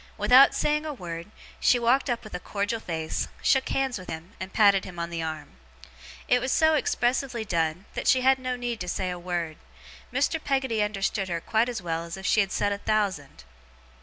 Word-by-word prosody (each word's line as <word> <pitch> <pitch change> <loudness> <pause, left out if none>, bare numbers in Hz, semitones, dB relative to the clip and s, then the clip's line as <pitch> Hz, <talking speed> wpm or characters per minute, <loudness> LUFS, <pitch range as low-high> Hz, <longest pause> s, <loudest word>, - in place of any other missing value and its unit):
Without 260 +2 +6
saying 300 0 +1
a 305 -2 -5
word, 170 -5 -7 0.3
she 250 - +4
walked 245 +4 +2
up 240 -1 -1
with 215 - -11
a 180 - -3
cordial 205 +4 -2
face, 160 -6 -3 0.2
shook 265 -1 +3
hands 265 -5 0
with 185 - -11
him, 160 +2 -7
and 190 +1 -6
patted 200 -3 +4
him 180 -2 -9
on 170 0 -4
the 165 -1 -3
arm. 155 - -6 0.7
It 250 - +3
was 260 +1 -1
so 315 +2 +4
expressively 250 -4 0
done, 170 0 -1
that - - -4
she 260 - +5
had 265 +1 +4
no 255 -1 -2
need 240 -2 -4
to 180 - -5
say 185 +1 -2
a 180 - -5
word. 175 -3 -3 0.5
Mr. 320 -2 0
Peggotty 265 -5 0
understood 200 -1 -1
her 170 -1 -1
quite 220 +7 +1
as 235 -6 -5
well 165 -1 -2
as 170 +2 -7
if 190 - -9
she 215 - +3
had 195 -2 +1
said 205 - 0
a 200 - -2
thousand. 195 - -1
205 Hz, 210 wpm, -26 LUFS, 175-250 Hz, 0.7 s, Without